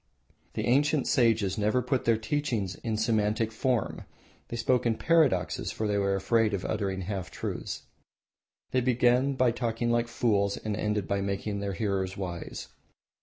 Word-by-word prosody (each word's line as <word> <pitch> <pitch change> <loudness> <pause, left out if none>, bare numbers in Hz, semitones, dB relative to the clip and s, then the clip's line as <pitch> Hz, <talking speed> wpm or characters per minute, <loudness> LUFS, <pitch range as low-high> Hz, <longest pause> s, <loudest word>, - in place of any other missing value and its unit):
The - - -1
ancient 145 +3 +3
sages 115 -7 +2
never 105 +4 +2
put 130 -3 -1
their 115 -1 +4
teachings 110 -5 -1
in 110 +3 -3
systematic 110 0 +1
form. 125 0 -1 0.4
They 120 - -5
spoke 120 +1 +2
in 115 - +2
paradoxes, 155 - +2
for 110 - -2
they 105 -1 +1
were 100 0 +1
afraid 105 +2 +2
of 95 - -5
uttering 100 -3 -2
half 95 -1 -4
truths. - - -5 0.9
They 130 - +2
began 125 +2 +3
by 130 -2 +3
talking 120 0 -1
like 120 0 +2
fools 100 -4 +1
and 105 -1 -3
ended 105 -2 -1
by 100 0 0
making 100 +1 -2
their 100 -1 -3
hearers 95 -2 -1
wise. 90 -3 -5
110 Hz, 160 wpm, -28 LUFS, 100-120 Hz, 0.9 s, their